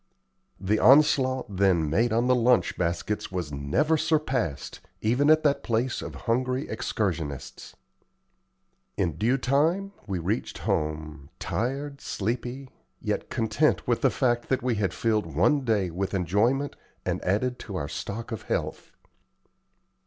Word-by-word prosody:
The 105 +3 +1
onslaught 130 -6 +4
then 90 -5 +3
made 115 +10 +2
on 115 +2 +2
the 125 - +4
lunch 125 0 +3
baskets 90 +5 -2
was 90 -5 -3
never 75 - +1
surpassed, 135 - -1 0.2
even 125 +7 +2
at 155 0 +5
that 145 -2 +2
place 120 +2 -1
of - - -7
hungry 125 +3 0
excursionists. 90 - -3 1.2
In 85 -6 0
due 115 +10 +2
time 160 +10 +1 0.2
we 95 -2 -2
reached 95 +7 -2
home, 75 -2 -2
tired, 140 +4 -3
sleepy, 120 +5 -3 0.3
yet - - -3
content 115 +7 +1
with 120 -1 +1
the - - +4
fact 120 -3 0
that 130 -2 0
we 125 -1 +1
had 100 -5 0
filled 105 -8 -1
one 120 - +3
day 105 -7 +1
with 95 +3 -2
enjoyment 110 - +1 0.3
and - - -2
added 125 +7 0
to 100 - -7
our 75 -5 -2
stock 110 +9 -5
of 110 - -4
health. - - -2
115 Hz, 140 wpm, -26 LUFS, 95-130 Hz, 1.2 s, at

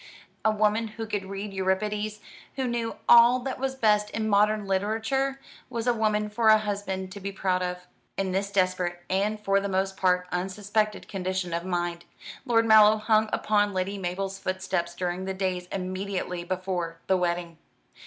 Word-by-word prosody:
A 220 - +4
woman 215 +1 +1
who 225 +1 -6
could 205 -3 -3
read 195 +1 -5
Euripides, 210 +3 -1 0.3
who 265 -1 -1
knew 235 -2 -2
all 240 +1 +8
that 260 0 -4
was 265 0 -2
best 210 -4 +2
in 220 0 -2
modern 210 0 +3
literature, 225 +8 0 0.3
was 235 -2 -3
a 245 - +3
woman 215 -2 +1
for 220 +2 0
a 215 - +8
husband 200 -3 -3
to 200 - -8
be 200 0 -4
proud 185 -2 0
of. 180 0 -4 0.3
In 195 -1 -1
this 195 +2 -1
desperate 185 -2 0
and 205 +3 0
for 195 -1 +2
the 200 0 -3
most 190 0 0
part 180 -1 +2
unsuspected 205 +4 -1
condition 185 -2 -3
of 170 +1 -2
mind, 175 -1 -2 0.4
Lord 230 -1 +3
Mallow 215 -1 +7
hung 215 0 +2
upon 205 -1 +1
Lady 195 +2 -2
Mabel's 190 +2 -3
footsteps 185 -2 -2
during 180 +1 -3
the 190 0 -3
days 185 -2 -2
immediately 185 -1 -3
before 180 -2 -3
the 190 - +3
wedding. 175 -2 -2
195 Hz, 170 wpm, -27 LUFS, 185-215 Hz, 0.4 s, all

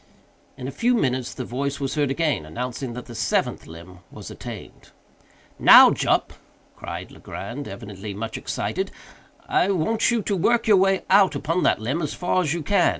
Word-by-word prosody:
In 125 - -6
a - - -4
few 240 - +1
minutes 130 - 0
the 125 - -6
voice 140 +4 -3
was 135 -1 -2
heard 145 -3 0
again, 150 - 0
announcing 125 - -5
that 125 +1 -7
the 120 - -10
seventh 115 0 -1
limb 85 +3 -12
was - - -10
attained. - - -10 0.7
"Now, - - +9
Jup," - - 0 0.4
cried - - -7
Legrand, 120 +8 -7
evidently 100 0 -8
much 110 +2 -5
excited, - - -3 0.6
"I 190 - +2
want 200 +4 +1
you 235 -3 0
to 200 - -1
work 230 +6 +2
your 215 -3 +5
way 195 0 +2
out 195 0 +5
upon 165 +4 -1
that - - +3
limb 130 +10 -2
as 150 -2 -3
far 180 +1 0
as 155 -5 -1
you 170 -1 -2
can. 195 +1 +3
140 Hz, 180 wpm, -23 LUFS, 120-185 Hz, 0.7 s, Now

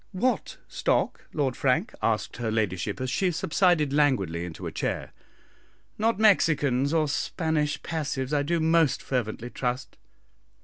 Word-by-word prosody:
"What 250 +7 -1
stock, - - 0
Lord 135 -5 -1
Frank?" - - +1
asked - - -1
her 115 -2 -2
ladyship, 105 -2 -1
as 130 -1 -2
she 185 +5 +1
subsided 170 -3 +2
languidly 100 - +1
into 85 -2 -8
a - - -4
chair; - - -3 0.8
"not 225 0 +1
Mexicans 150 - +3
or 160 -2 +2
Spanish 155 0 -1
passives, 145 -4 -3
I 145 - +3
do 165 +4 0
most 160 -2 +2
fervently 120 -1 -3
trust." 125 0 -3
145 Hz, 135 wpm, -26 LUFS, 125-165 Hz, 0.8 s, Mexicans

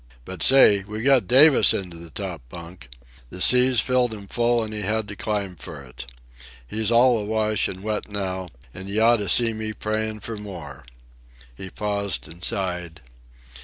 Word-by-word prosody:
—But, 95 -3 -9
say, 115 -5 +6
we 105 +2 -6
got 135 -2 +3
Davis 140 +3 +6
into 90 -3 -6
the 85 0 -12
top 75 - -6
bunk! 85 -2 -11 0.4
The 90 - -10
seas 125 +3 +5
filled 125 -3 0
him 100 -2 -11
full 120 +3 0
and 110 0 -6
he 105 - -4
had 110 0 -1
to 105 - -7
climb 100 -2 -3
for 75 -3 -10
it. 60 -1 -11 0.6
He's 110 - -2
all 120 0 +4
awash 110 0 -1
and 95 +1 -8
wet 105 0 -4
now, 95 -3 -4 0.2
and 95 +2 -9
you 105 +2 -1
oughta 110 -3 +3
seen 115 +2 +2
me 110 0 -4
praying 110 0 -3
for 115 +1 -6
more." 85 -11 -10 0.7
He 95 +6 -8
paused 100 -5 -3
and 85 +3 -14
sighed. 90 -5 -3
105 Hz, 170 wpm, -23 LUFS, 95-110 Hz, 0.7 s, say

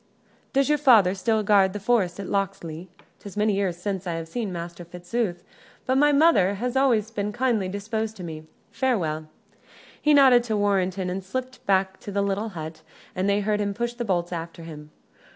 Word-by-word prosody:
Does 275 -1 +2
your 300 0 +2
father 225 -10 +6
still 215 +3 0
guard 200 -2 +4
the 205 - -4
forest 200 -4 +1
at 195 - -5
Locksley? 185 -4 -3 0.3
'Tis 200 0 -10
many 210 0 +2
years 195 -3 -1
since 190 0 -4
I 170 - -1
have 165 0 -5
seen 215 +2 -3
Master 170 0 -6
Fitzooth, 175 +2 -3 0.4
but 260 +1 +2
thy 295 +1 +5
mother 280 - +4
hath 245 +5 -3
always 235 -5 +2
been 205 -1 -2
kindly 220 -5 0
disposed 220 +2 -3
to 185 - -8
me. 155 -2 -7 0.2
Farewell." 160 - -1 0.7
He 300 0 +4
nodded 260 -4 +6
to 220 -3 -1
Warrenton, 190 -2 0
and 190 +1 -4
slipped 255 +6 -5
back 190 -1 +1
to 205 - -8
the 200 0 0
little 200 +3 -1
hut, 160 -4 -7 0.3
and 190 +2 0
they 200 +1 +2
heard 210 +1 0
him 200 -1 -2
push 235 +2 -2
the 240 0 -4
bolts 175 -5 -1
after 165 0 -6
him. 150 -2 -10
200 Hz, 190 wpm, -25 LUFS, 180-230 Hz, 0.7 s, father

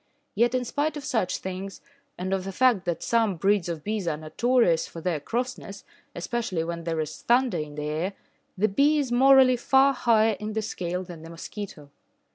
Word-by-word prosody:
Yet 235 +3 +2
in 250 -1 0
spite 295 +5 -1
of 285 - -7
such 185 -7 0
things, 190 +1 -6 0.4
and 185 +1 -2
of 190 -1 -1
the 195 - -5
fact 230 -3 +3
that 175 -2 -2
some 225 -4 +2
breeds 195 +1 +1
of 160 -3 -5
bees 210 -3 -2
are 155 -2 0
notorious 175 +2 +1
for 165 - -9
their 165 -2 -1
crossness, 235 - -4 0.3
especially 185 -2 -2
when 170 0 -5
there 165 -1 -1
is 155 0 -6
thunder 245 -2 +2
in 150 -1 -6
the 150 - -4
air, 160 +6 -2 0.4
the 210 +3 +3
bee 280 +9 +3
is 275 -4 -1
morally 260 0 +6
far 270 +3 +4
higher 225 -3 +3
in 215 0 -4
the 220 0 -1
scale 180 -2 -3
than 175 -3 -10
the 165 - -10
mosquito. 165 -3 -8
200 Hz, 195 wpm, -26 LUFS, 170-240 Hz, 0.4 s, morally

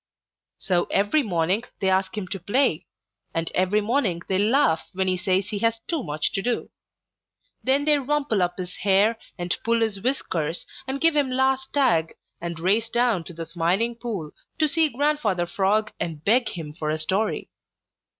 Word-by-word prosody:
So 180 -2 +1
every 205 +10 +2
morning 185 - 0 0.2
they 190 - 0
ask 190 +3 +1
him 195 -3 -3
to 195 - -4
play, 205 - +1 0.5
and 165 0 -1
every 185 +3 +2
morning 205 -6 0
they 190 -1 +1
laugh 210 - +2
when 190 0 0
he 185 - +2
says 185 +2 0
he 210 -2 -3
has 230 +1 +1
too 330 -4 -1
much 150 0 -1
to 195 - -1
do. 240 +3 -2 0.9
Then 275 +2 +2
they 300 -1 +4
rumple 280 -6 0
up 175 0 0
his 180 -1 -6
hair 205 +4 +3 0.2
and 175 -1 -1
pull 230 0 +2
his 215 -3 0
whiskers 170 - -1 0.2
and 265 +1 -2
give 330 0 +4
him 285 -3 +2
last 265 +1 +1
tag 235 - +2 0.3
and 170 -1 -4
race 210 +6 +1
down 235 -8 +1
to 175 - -9
the 165 0 -5
Smiling 180 +8 0
Pool 220 -10 -5 0.3
to 310 -2 +3
see 320 0 +2
Grandfather 250 -10 +1
Frog 210 +3 +1
and 160 -3 -4
beg 240 +4 +3
him 155 -4 -7
for 155 -1 -3
a 155 - 0
story. 190 +7 -1
205 Hz, 180 wpm, -24 LUFS, 175-250 Hz, 0.9 s, they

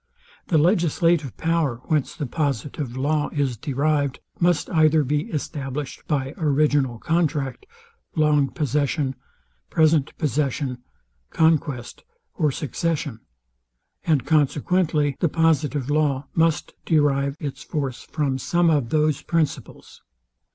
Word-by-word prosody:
The 165 - +3
legislative 165 - +2
power, 165 -6 +1
whence 150 -2 -1
the 155 -4 -3
positive 140 -2 -3
law 145 +2 0
is 140 -4 0
derived, 140 +3 0 0.2
must 175 -3 +2
either 155 -2 +4
be 145 +3 -1
established 145 -2 -5
by 135 -2 -1
original 145 -5 +2
contract, 155 - -1 0.5
long 150 -3 +3
possession, 145 -1 0 0.6
present 155 -3 +2
possession, 140 -3 -1 0.5
conquest, 150 -6 0 0.3
or 155 -5 +1
succession; 145 -2 -2 0.8
and 155 -6 +1
consequently 150 -1 +1
the 170 - +2
positive 150 -4 +1
law 145 -3 +1
must 165 -1 +1
derive 140 -3 +2
its 145 -3 -5
force 140 -6 -3
from 140 -4 -2
some 170 +5 +2
of 140 -7 +1
those 150 0 +1
principles. 165 -2 -3
150 Hz, 110 wpm, -23 LUFS, 140-160 Hz, 0.8 s, either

